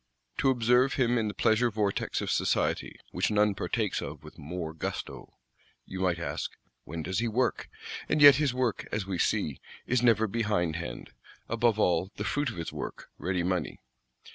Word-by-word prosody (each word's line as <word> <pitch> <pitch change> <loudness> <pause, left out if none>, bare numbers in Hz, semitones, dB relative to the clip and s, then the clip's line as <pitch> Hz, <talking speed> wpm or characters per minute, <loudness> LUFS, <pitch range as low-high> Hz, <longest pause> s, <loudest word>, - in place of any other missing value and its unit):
To 135 - +3
observe 125 +1 +3
him 120 -2 +2
in 110 - 0
the 105 - -3
pleasure 115 +2 +3
vortex 105 -2 -1
of - - -2
society, - - 0 0.2
which - - 0
none 105 -1 +3
partakes 95 - -1
of 75 0 -7
with 75 +2 -13
more 80 +1 -5
gusto, 80 - -6 0.5
you 95 - -7
might 90 -2 +1
ask, 85 - -4 0.3
When 80 +1 -5
does 95 +6 -1
he 120 - 0
work? 120 0 0 0.4
And - - +2
yet 145 -2 +10
his 145 -3 +2
work, 125 -3 -1
as 105 -2 -1
we 95 -3 -3
see, 75 -3 0 0.3
is 125 -1 +1
never 115 -3 +4
behindhand; 90 - -2 0.4
above 115 -1 +2
all, 90 -3 +2
the - - -4
fruit 145 -2 0
of - - -7
his 85 - -5
work: - - -6
ready 90 -1 -1
money. 90 0 -1
105 Hz, 175 wpm, -29 LUFS, 85-120 Hz, 0.5 s, yet